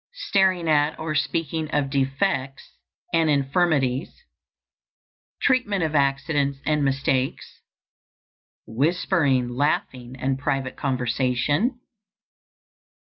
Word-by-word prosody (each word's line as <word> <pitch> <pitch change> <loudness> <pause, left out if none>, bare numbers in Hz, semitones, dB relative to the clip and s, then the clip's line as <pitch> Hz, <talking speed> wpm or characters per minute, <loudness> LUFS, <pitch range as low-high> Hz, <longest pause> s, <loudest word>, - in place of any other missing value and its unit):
_ - - -
Staring 190 - +1
at 150 -1 +2
or 160 -1 -3
speaking 160 0 -1
of 145 -3 -1
defects 135 0 -1 0.4
and 165 -1 +3
infirmities. 140 -1 +1 1.3
Treatment 210 -8 +2
of 155 -1 -1
accidents 140 0 +1
and 150 -1 +1
mistakes. 135 -1 -1 1.1
_Whispering, 140 - +1
laughing, 130 -2 -1
and 135 +1 -1
private 135 -2 -2
conversation. 135 - 0
145 Hz, 85 wpm, -24 LUFS, 135-160 Hz, 1.3 s, and